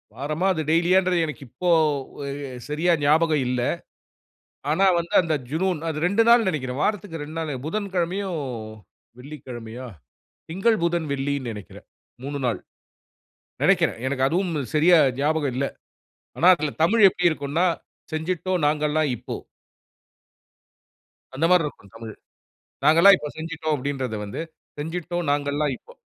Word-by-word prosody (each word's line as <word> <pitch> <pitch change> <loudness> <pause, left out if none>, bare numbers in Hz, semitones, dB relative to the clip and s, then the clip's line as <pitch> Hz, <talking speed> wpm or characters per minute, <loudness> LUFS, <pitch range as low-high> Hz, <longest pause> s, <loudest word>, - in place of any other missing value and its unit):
வாரமா? 150 +7 -2
அது 160 - -2
டெய்லியான்றது? 180 +2 +3
எனக்கு 150 -2 -7
இப்போ 175 +9 -3 0.6
எ - - -3 0.4
சரியா 165 +4 +2
ஞாபகம் 155 0 +3
இல்ல. 125 -1 0 1.1
ஆனா 190 +6 +3
வந்து 170 +4 -4
அந்த 165 -2 0 0.2
ஜுனூன், 175 +1 0
அது 155 -2 -3
2 200 +5 +3
நாள் 235 -2 +6
நெனைக்கிறேன். 130 -5 -3
வாரத்துக்கு 200 -6 -2
2 155 +2 -8
நாளு, 160 -2 -3
புதன்கிழமையோ, 190 0 -2 0.9
வெள்ளிக்கிழமையோ 125 -3 -8 0.6
திங்கள், 195 +7 +2
புதன், 170 -2 0
வெள்ளின்னு 140 -2 -2
நெனைக்குறேன். 105 -3 -11 0.4
3 145 +1 -4
நாள். 115 -6 0 1.0
நெனைக்குறேன் - - +3
எனக்கு 130 -1 +1
அதுவும் 180 +4 0 0.2
சரியா 165 +3 +6 0.2
ஞாபகம் 145 -2 0
இல்ல. 135 +2 0 0.7
ஆனா 175 - +4
அதுல 150 -3 -3
தமிழ் 215 +6 +4
எப்டி 180 -1 -3
இருக்குன்னா? 155 +3 -1 0.5
"செஞ்சுட்டோம் 175 +2 -2
நாங்கல்லாம் 150 0 +1
இப்போ." 120 - -6 2.0
அந்த 150 +5 +1
மாரி 180 -2 +5
இருக்கும் 105 -9 -9
தமிழ். 115 -1 -8 0.7
"நாங்கல்லாம் 170 +6 +7
இப்போ 150 - -5
செஞ்சுட்டோம்" 160 -1 -2
அப்டின்றத 130 -4 -3
வந்து, 100 - -6 0.4
"செஞ்சுட்டோம் 175 +2 -3
நாங்கல்லாம் 145 0 0
இப்போ." - - -18
155 Hz, 125 wpm, -24 LUFS, 140-175 Hz, 2.0 s, நாங்கல்லாம்